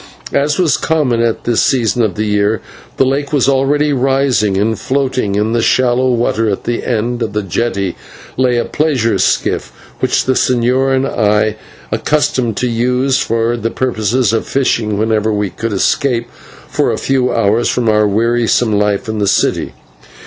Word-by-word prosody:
As 150 Hz, +2 st, +1 dB
was 175 Hz, -5 st, +2 dB
common 145 Hz, -8 st, 0 dB
at 115 Hz, -1 st, -1 dB
this 120 Hz, -2 st, +1 dB
season 120 Hz, -2 st, +1 dB
of 105 Hz, -6 st, 0 dB
the 110 Hz, -, -1 dB
year, 105 Hz, +1 st, +1 dB, 0.4 s
the 135 Hz, -, +3 dB
lake 140 Hz, +2 st, -1 dB
was 145 Hz, -4 st, +2 dB
already 140 Hz, +2 st, +2 dB
rising, 130 Hz, -6 st, +1 dB
and 110 Hz, +2 st, 0 dB
floating 130 Hz, -6 st, -1 dB
in 105 Hz, +2 st, 0 dB
the 120 Hz, -, +1 dB
shallow 125 Hz, +2 st, +2 dB
water 115 Hz, -2 st, 0 dB
at 100 Hz, -, -3 dB
the 120 Hz, -1 st, -2 dB
end 120 Hz, +1 st, -2 dB
of 110 Hz, -3 st, -2 dB
the 105 Hz, 0 st, -1 dB
jetty 100 Hz, -1 st, -2 dB, 0.4 s
lay 125 Hz, -2 st, +1 dB
a 120 Hz, -, 0 dB
pleasure 125 Hz, -10 st, 0 dB
skiff -, -, 0 dB, 0.3 s
which -, -, +1 dB
the 130 Hz, -, +2 dB
señor 130 Hz, +2 st, +1 dB
and 130 Hz, +1 st, +1 dB
I 105 Hz, -1 st, +1 dB, 0.4 s
were -, -, +1 dB
accustomed 130 Hz, -7 st, 0 dB
to 125 Hz, -, 0 dB
use 125 Hz, +3 st, +1 dB
for 115 Hz, +1 st, 0 dB
the 115 Hz, -1 st, -2 dB
purpose 115 Hz, -2 st, 0 dB
of 115 Hz, -, -1 dB
fishing 115 Hz, -6 st, 0 dB
whenever 110 Hz, 0 st, 0 dB
we 105 Hz, -2 st, -1 dB
could 115 Hz, 0 st, -4 dB
escape 120 Hz, +4 st, 0 dB, 0.4 s
for -, -, 0 dB
a -, -, -2 dB
few 130 Hz, -2 st, 0 dB
hours 115 Hz, +1 st, +1 dB
from 120 Hz, -2 st, -1 dB
our 105 Hz, -1 st, +3 dB
wearisome 115 Hz, +2 st, +1 dB
life 105 Hz, +2 st, 0 dB
in 110 Hz, -1 st, -3 dB
the 100 Hz, -, 0 dB
city. 100 Hz, -, 0 dB
120 Hz, 175 wpm, -14 LUFS, 110-130 Hz, 0.4 s, the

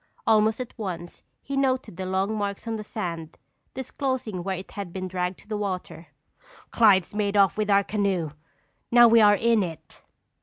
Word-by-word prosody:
Almost 220 Hz, 0 st, +3 dB
at 250 Hz, -1 st, -6 dB
once 175 Hz, -4 st, -6 dB, 0.2 s
he 275 Hz, -, -4 dB
noted 260 Hz, -7 st, 0 dB
the 185 Hz, +1 st, -5 dB
long 190 Hz, +3 st, 0 dB
marks 205 Hz, +1 st, -4 dB
on 225 Hz, -, -2 dB
the 215 Hz, -, -5 dB
sand, 170 Hz, -7 st, -6 dB, 0.4 s
disclosing 260 Hz, -6 st, -3 dB
where 190 Hz, 0 st, -2 dB
it 185 Hz, -, -9 dB
had 200 Hz, -4 st, -6 dB
been 185 Hz, +1 st, -4 dB
dragged 180 Hz, 0 st, -3 dB
to -, -, -23 dB
the 215 Hz, -, -3 dB
water. 185 Hz, -5 st, -5 dB, 0.6 s
"Clyde's 200 Hz, -6 st, +4 dB
made 205 Hz, -1 st, 0 dB
off 195 Hz, -2 st, +4 dB
with 215 Hz, -1 st, -1 dB
our 200 Hz, 0 st, +5 dB
canoe! 195 Hz, -7 st, -1 dB, 0.6 s
Now 240 Hz, 0 st, +7 dB
we 230 Hz, 0 st, +6 dB
are 205 Hz, -1 st, +6 dB
in 230 Hz, +1 st, +2 dB
it!" 165 Hz, -4 st, -7 dB
205 Hz, 180 wpm, -25 LUFS, 185-225 Hz, 0.6 s, Now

